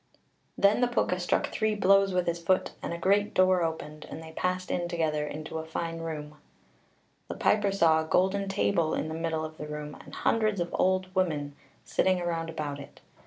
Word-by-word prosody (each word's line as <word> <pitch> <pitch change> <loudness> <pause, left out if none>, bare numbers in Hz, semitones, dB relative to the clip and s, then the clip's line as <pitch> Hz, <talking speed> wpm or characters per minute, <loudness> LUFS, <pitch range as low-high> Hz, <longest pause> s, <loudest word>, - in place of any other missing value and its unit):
Then 200 +4 +4
the 245 - +4
Púca 185 -6 0
struck 180 - 0
three 215 -1 0
blows 195 -1 +4
with 180 -1 +1
his 170 0 -2
foot, 185 +2 +1
and - - -4
a 170 - -3
great 200 +4 +2
door 185 -1 +4
opened, 155 -2 -4
and - - -7
they 160 - -10
passed 185 +2 -2
in 175 -1 -1
together, 155 -3 -1
into 155 +2 -5
a - - -4
fine 165 +1 -4
room. 150 -2 -6 0.9
The - - -5
piper 205 -2 +2
saw 165 -5 +4
a - - -4
golden 195 +3 +2
table 195 -4 +1
in 155 - -2
the - - -4
middle 160 -1 -2
of 155 0 -10
the 150 - -5
room, 150 0 -6
and - - -11
hundreds 215 -3 +1
of 175 - -2
old 185 0 +1
women 160 -6 0
(cailleacha) 140 -1 -26
sitting 185 -1 +2
round 165 -1 -2
about 150 -3 -4
it. 140 - -12
170 Hz, 205 wpm, -28 LUFS, 160-190 Hz, 0.9 s, Then